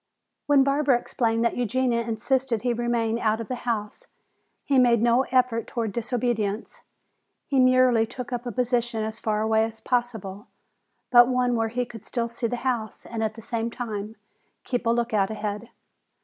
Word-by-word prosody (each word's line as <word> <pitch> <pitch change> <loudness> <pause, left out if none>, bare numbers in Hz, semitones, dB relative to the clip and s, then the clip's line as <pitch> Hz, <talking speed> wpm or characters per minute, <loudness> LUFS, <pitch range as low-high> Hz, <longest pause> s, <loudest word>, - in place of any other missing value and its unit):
When 285 -2 +5
Barbara 275 -1 +3
explained 230 -1 -1
that 235 - +1
Eugenia 245 0 +1
insisted 235 +1 -1
he 245 -1 +1
remain 235 -1 0
out 220 -1 +1
of 230 - -6
the 250 -1 -4
house, 210 -2 -3 0.6
he 275 -2 +3
made 240 -2 +5
no 240 +3 +3
effort 250 -3 +1
toward 225 -3 -2
disobedience. 230 -2 -2 0.6
He 275 - +1
merely 255 -3 +4
took 250 +1 -7
up 245 0 -4
a - - -2
position 240 -1 0
as 220 0 -5
far 215 -1 0
away 220 0 +3
as 225 0 -5
possible, 225 -4 -2 0.6
but 240 -1 +8
one 250 -1 +1
where 225 -1 +1
he 245 +2 -1
could 225 -3 -11
still 235 -2 -2
see 235 0 -3
the 245 - -2
house 235 -4 -2
and 225 -1 -4
at 215 0 -2
the 225 - -11
same 230 0 -2
time 220 -3 -5 0.5
keep 245 -2 -2
a - - +4
lookout 230 -4 +1
ahead. 215 +1 -4
235 Hz, 175 wpm, -25 LUFS, 220-245 Hz, 0.6 s, but